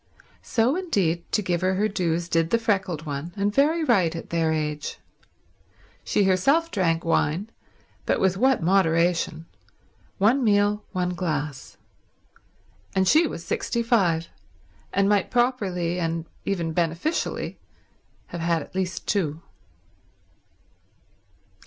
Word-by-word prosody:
So, 240 Hz, +5 st, +1 dB
indeed, 195 Hz, -, -1 dB
to 210 Hz, -, +1 dB
give 175 Hz, -2 st, -1 dB
her 185 Hz, +1 st, +1 dB
her 210 Hz, +3 st, +2 dB
dues, 175 Hz, -4 st, -1 dB
did 165 Hz, -1 st, +1 dB
the 230 Hz, -, +3 dB
freckled 190 Hz, -8 st, -1 dB
one; 145 Hz, +3 st, -5 dB
and 200 Hz, +1 st, 0 dB
very 310 Hz, +6 st, +3 dB
right 185 Hz, -, +2 dB
at 165 Hz, -, -8 dB
their 165 Hz, -1 st, +1 dB
age. 150 Hz, -1 st, -3 dB, 1.1 s
She 205 Hz, -, +1 dB
herself 275 Hz, -, +2 dB
drank 170 Hz, -4 st, 0 dB
wine, 165 Hz, +6 st, 0 dB, 0.6 s
but -, -, +2 dB
with 190 Hz, -1 st, +2 dB
what 260 Hz, -1 st, +2 dB
moderation: 170 Hz, -2 st, +2 dB, 0.7 s
one 230 Hz, +7 st, +3 dB
meal, 205 Hz, -1 st, +2 dB
one 180 Hz, -2 st, -1 dB
glass. 150 Hz, -6 st, -4 dB, 1.2 s
And 190 Hz, -1 st, +2 dB
she 315 Hz, -, +5 dB
was 170 Hz, -, -7 dB
sixty 235 Hz, -1 st, -1 dB
five, 175 Hz, -9 st, +2 dB, 0.6 s
and 195 Hz, 0 st, +2 dB
might 205 Hz, -2 st, +2 dB
properly, 195 Hz, -9 st, 0 dB
and 165 Hz, -1 st, -2 dB, 0.2 s
even 170 Hz, -5 st, -1 dB
beneficially, 170 Hz, -, -2 dB, 0.7 s
have 170 Hz, -, -6 dB
had 165 Hz, -2 st, +1 dB
at -, -, -17 dB
least 185 Hz, -1 st, -3 dB
two. 165 Hz, -6 st, -1 dB
185 Hz, 125 wpm, -25 LUFS, 165-210 Hz, 1.2 s, she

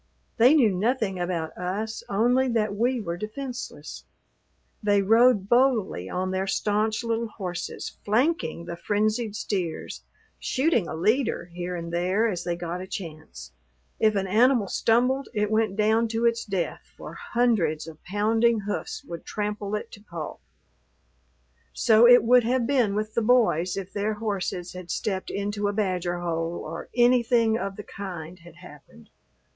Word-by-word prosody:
They 250 Hz, +6 st, +6 dB
knew 240 Hz, -9 st, +5 dB
nothing 200 Hz, 0 st, 0 dB
about 175 Hz, -3 st, -3 dB
us 205 Hz, +5 st, -3 dB
only 245 Hz, +6 st, +2 dB
that 215 Hz, -4 st, 0 dB
we 245 Hz, +4 st, +1 dB
were 170 Hz, -5 st, -4 dB
defenseless. 245 Hz, +6 st, -7 dB, 0.8 s
They 205 Hz, -2 st, +3 dB
rode 225 Hz, -1 st, +4 dB
boldly 230 Hz, -, +2 dB
on 185 Hz, +1 st, -2 dB
their 190 Hz, +1 st, -1 dB
stanch 215 Hz, +3 st, 0 dB
little 230 Hz, 0 st, -1 dB
horses 180 Hz, -5 st, -6 dB
flanking 215 Hz, -, 0 dB
the 170 Hz, -, -5 dB
frenzied 215 Hz, +3 st, -1 dB
steers, 185 Hz, -6 st, -3 dB, 0.4 s
shooting 260 Hz, -, +1 dB
a -, -, -5 dB
leader 210 Hz, -, 0 dB
here 180 Hz, +1 st, -4 dB
and 170 Hz, -1 st, -6 dB
there 185 Hz, +6 st, +1 dB
as 185 Hz, -6 st, -3 dB
they 175 Hz, -1 st, -2 dB
got 175 Hz, +1 st, -5 dB
a 185 Hz, -, -7 dB
chance. 155 Hz, -, -8 dB, 0.5 s
If 215 Hz, -1 st, +3 dB
an 195 Hz, -1 st, 0 dB
animal 225 Hz, +2 st, +3 dB
stumbled 250 Hz, +7 st, +1 dB
it 210 Hz, 0 st, 0 dB
went 220 Hz, -2 st, +1 dB
down 220 Hz, +2 st, +2 dB
to 225 Hz, +1 st, -1 dB
its 230 Hz, 0 st, +1 dB
death, 190 Hz, -5 st, -2 dB, 0.2 s
for -, -, -9 dB
hundreds 215 Hz, -12 st, 0 dB
of 160 Hz, -1 st, -12 dB
pounding 220 Hz, +3 st, +2 dB
hoofs 205 Hz, +1 st, -4 dB
would 170 Hz, -1 st, -8 dB
trample 210 Hz, -1 st, -3 dB
it 210 Hz, -, -5 dB
to 205 Hz, -, -12 dB
pulp. 170 Hz, -, -7 dB, 1.3 s
So 225 Hz, +1 st, +5 dB
it 245 Hz, 0 st, +8 dB
would 245 Hz, +1 st, +5 dB
have 245 Hz, +1 st, +1 dB
been 240 Hz, -6 st, +2 dB
with 215 Hz, +1 st, -2 dB
the 230 Hz, -, +1 dB
boys 215 Hz, -7 st, +2 dB
if 195 Hz, 0 st, -6 dB
their 210 Hz, +1 st, -1 dB
horses 195 Hz, -4 st, -3 dB
had 180 Hz, -1 st, -9 dB
stepped 190 Hz, -3 st, -2 dB
into 205 Hz, +1 st, -2 dB
a 205 Hz, -, -1 dB
badger 180 Hz, -4 st, -1 dB
hole 165 Hz, 0 st, -2 dB
or 165 Hz, +2 st, -7 dB
anything 240 Hz, -2 st, +4 dB
of 195 Hz, -4 st, -3 dB
the 210 Hz, -, -8 dB
kind 180 Hz, -4 st, -8 dB
had 170 Hz, -1 st, -15 dB
happened. 145 Hz, -, -15 dB
210 Hz, 155 wpm, -26 LUFS, 180-230 Hz, 1.3 s, it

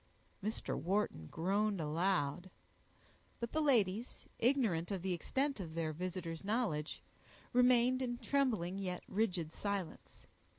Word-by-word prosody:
Mr. 215 Hz, +2 st, -2 dB
Wharton 185 Hz, -, 0 dB
groaned 200 Hz, -, +1 dB
aloud; 165 Hz, +1 st, 0 dB, 0.9 s
but 235 Hz, -1 st, -3 dB
the 315 Hz, -, +1 dB
ladies, 230 Hz, -6 st, +2 dB
ignorant 225 Hz, -10 st, +2 dB
of 195 Hz, -4 st, -3 dB
the 190 Hz, -1 st, 0 dB
extent 270 Hz, -, 0 dB
of 165 Hz, -4 st, -6 dB
their 160 Hz, -2 st, -1 dB
visitor's 175 Hz, -1 st, -4 dB
knowledge, 195 Hz, -8 st, -1 dB, 0.5 s
remained 250 Hz, +1 st, +5 dB
in 240 Hz, -2 st, -1 dB
trembling 225 Hz, -10 st, +1 dB
yet 180 Hz, -2 st, -3 dB
rigid 185 Hz, -6 st, 0 dB
silence. 200 Hz, -4 st, -4 dB
195 Hz, 120 wpm, -36 LUFS, 170-240 Hz, 0.9 s, remained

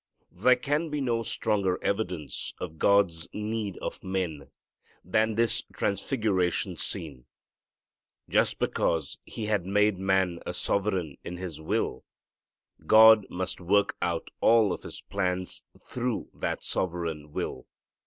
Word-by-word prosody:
There 125 Hz, +8 st, +4 dB
can 145 Hz, +6 st, -1 dB
be 150 Hz, 0 st, -2 dB
no 120 Hz, -4 st, 0 dB
stronger 100 Hz, -5 st, 0 dB
evidence 90 Hz, -, -2 dB
of 80 Hz, 0 st, -7 dB
God's 95 Hz, -5 st, +3 dB
need 105 Hz, -2 st, -3 dB
of -, -, -5 dB
men 90 Hz, -6 st, -3 dB, 0.6 s
than 110 Hz, +5 st, +2 dB
this 115 Hz, 0 st, +2 dB
transfiguration 100 Hz, -, 0 dB
scene. 70 Hz, -7 st, -5 dB, 1.0 s
Just -, -, +2 dB
because 80 Hz, -4 st, 0 dB
He 110 Hz, -, -5 dB
had 105 Hz, -4 st, 0 dB
made 105 Hz, 0 st, +3 dB
man 95 Hz, -2 st, +1 dB
a -, -, -5 dB
sovereign 95 Hz, -7 st, -1 dB
in 90 Hz, -, -6 dB
his 90 Hz, -4 st, -6 dB
will, 80 Hz, -, -1 dB, 0.8 s
God 110 Hz, -1 st, +8 dB
must 90 Hz, +1 st, -4 dB
work 100 Hz, +3 st, +2 dB
out 85 Hz, -1 st, -1 dB
all 110 Hz, -4 st, +5 dB
of -, -, -6 dB
His -, -, -9 dB
plans 90 Hz, -2 st, -2 dB, 0.2 s
through 125 Hz, -1 st, -2 dB
that -, -, -3 dB
sovereign 80 Hz, -4 st, -2 dB
will. -, -, -4 dB
95 Hz, 125 wpm, -28 LUFS, 85-110 Hz, 1.0 s, God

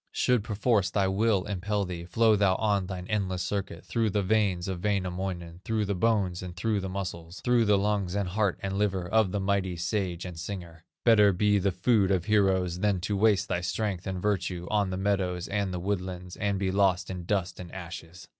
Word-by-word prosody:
"Should 125 Hz, -4 st, +2 dB
perforce 105 Hz, -2 st, +1 dB
thy 100 Hz, -1 st, +1 dB
will 100 Hz, 0 st, +2 dB
impel 100 Hz, +1 st, -1 dB
thee, 85 Hz, -2 st, -6 dB
Flow 110 Hz, +5 st, +3 dB
thou 100 Hz, -2 st, +3 dB
on 100 Hz, -3 st, +1 dB
thine 90 Hz, -2 st, -5 dB
endless 95 Hz, -4 st, -1 dB
circuit, 100 Hz, -4 st, -4 dB
Through 115 Hz, -2 st, 0 dB
the 100 Hz, 0 st, 0 dB
veins 95 Hz, -3 st, +1 dB
of 90 Hz, -2 st, -4 dB
Wainamoinen, 90 Hz, -3 st, -2 dB
Through 110 Hz, -2 st, 0 dB
the 100 Hz, -, -1 dB
bones, 95 Hz, -3 st, +1 dB
and 90 Hz, -1 st, -7 dB
through 105 Hz, +3 st, 0 dB
the 95 Hz, -1 st, -4 dB
muscles, 90 Hz, -2 st, -5 dB
Through 120 Hz, -2 st, +3 dB
the 105 Hz, -1 st, +4 dB
lungs, 100 Hz, -2 st, 0 dB
and 100 Hz, -3 st, -1 dB
heart, 100 Hz, 0 st, 0 dB
and 95 Hz, 0 st, -2 dB
liver, 95 Hz, -4 st, 0 dB
Of 110 Hz, -1 st, +2 dB
the 100 Hz, -, -1 dB
mighty 95 Hz, -2 st, 0 dB
sage 90 Hz, 0 st, -2 dB
and 90 Hz, -3 st, -7 dB
singer; 85 Hz, -3 st, -7 dB, 0.2 s
Better 105 Hz, -4 st, +6 dB
be 105 Hz, +2 st, +2 dB
the 100 Hz, +1 st, +1 dB
food 100 Hz, +1 st, +2 dB
of 95 Hz, -3 st, +1 dB
heroes, 95 Hz, -4 st, +2 dB
Than 100 Hz, -2 st, +1 dB
to 100 Hz, +3 st, -1 dB
waste 100 Hz, -1 st, +3 dB
thy 90 Hz, -, -1 dB
strength 95 Hz, +1 st, -2 dB
and 95 Hz, -1 st, -3 dB
virtue, 90 Hz, -3 st, -1 dB
On 105 Hz, -2 st, +2 dB
the 95 Hz, -, -3 dB
meadows 95 Hz, -3 st, 0 dB
and 100 Hz, -2 st, -1 dB
the 90 Hz, -, -3 dB
woodlands, 90 Hz, -1 st, -3 dB
And 100 Hz, -1 st, -1 dB
be 95 Hz, -1 st, 0 dB
lost 95 Hz, -1 st, +2 dB
in 90 Hz, -2 st, -6 dB
dust 95 Hz, -1 st, -1 dB
and 90 Hz, -2 st, -8 dB
ashes. 85 Hz, -1 st, -9 dB
95 Hz, 205 wpm, -28 LUFS, 90-105 Hz, 0.2 s, Better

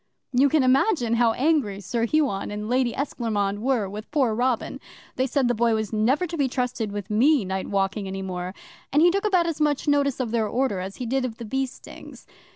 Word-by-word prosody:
'You 270 Hz, +3 st, +4 dB
can 300 Hz, -1 st, +3 dB
imagine 255 Hz, -, +2 dB
how 235 Hz, -1 st, +3 dB
angry 265 Hz, -8 st, +1 dB
Sir 230 Hz, +4 st, -1 dB
Huon 280 Hz, -9 st, 0 dB
and 210 Hz, +1 st, -5 dB
Lady 250 Hz, 0 st, +1 dB
Esclairmonde 210 Hz, -7 st, -2 dB
were 245 Hz, -5 st, +1 dB
with 210 Hz, +3 st, -8 dB
poor 270 Hz, -7 st, +1 dB
Robin! 245 Hz, +1 st, -1 dB, 0.4 s
They 260 Hz, +1 st, 0 dB
said 270 Hz, 0 st, +1 dB
the 245 Hz, -, +2 dB
Boy 230 Hz, 0 st, +2 dB
was 220 Hz, 0 st, -3 dB
never 250 Hz, +11 st, +2 dB
to 340 Hz, -1 st, -5 dB
be 280 Hz, -3 st, +2 dB
trusted 250 Hz, -4 st, -2 dB
with 205 Hz, 0 st, -6 dB
me 255 Hz, +2 st, +3 dB
night 190 Hz, 0 st, -3 dB
walking 195 Hz, 0 st, -1 dB
any 190 Hz, 0 st, -5 dB
more 180 Hz, 0 st, -5 dB, 0.4 s
and 295 Hz, +3 st, +4 dB
he 350 Hz, -, +6 dB
took 395 Hz, +3 st, -1 dB
about 370 Hz, -5 st, +3 dB
as 330 Hz, -2 st, -3 dB
much 295 Hz, -2 st, +1 dB
notice 285 Hz, -2 st, +2 dB
of 245 Hz, -4 st, -2 dB
their 225 Hz, -2 st, +1 dB
order 245 Hz, -3 st, 0 dB
as 190 Hz, +2 st, -6 dB
he 250 Hz, -, -5 dB
did 260 Hz, +3 st, 0 dB
of 235 Hz, -3 st, -4 dB
the 235 Hz, -, -7 dB
bee 265 Hz, +4 st, -1 dB
stings. -, -, -13 dB
240 Hz, 220 wpm, -24 LUFS, 210-275 Hz, 0.4 s, he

